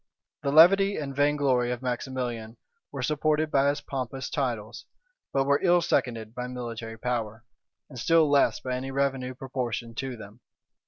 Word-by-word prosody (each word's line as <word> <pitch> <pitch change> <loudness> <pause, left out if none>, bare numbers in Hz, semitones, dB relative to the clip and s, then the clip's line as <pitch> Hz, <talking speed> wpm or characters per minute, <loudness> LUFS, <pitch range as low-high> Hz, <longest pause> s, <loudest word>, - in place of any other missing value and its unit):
The 140 - -1
levity 195 +6 +6
and 140 -3 -4
vain 145 +1 +3
glory 130 -4 +2
of 125 +1 -4
Maximilian 120 -3 -4 0.3
were 135 -3 -5
supported 155 +2 +1
by 140 0 +3
his 145 +1 -2
pompous 135 -1 -5
titles; 120 -6 -3 0.4
but 135 - +2
were 140 +1 +2
ill 175 -1 +4
seconded 115 -9 -1
by 125 0 -4
military 115 -2 -6
power, 110 -1 -3 0.4
and 130 -4 -10
still 165 +4 +4
less 140 -1 +3
by 130 - -4
any 130 +1 -4
revenue 135 -2 -1
proportioned 120 -3 -4
to 130 -2 -4
them. 105 +1 -12
130 Hz, 160 wpm, -27 LUFS, 120-145 Hz, 0.4 s, levity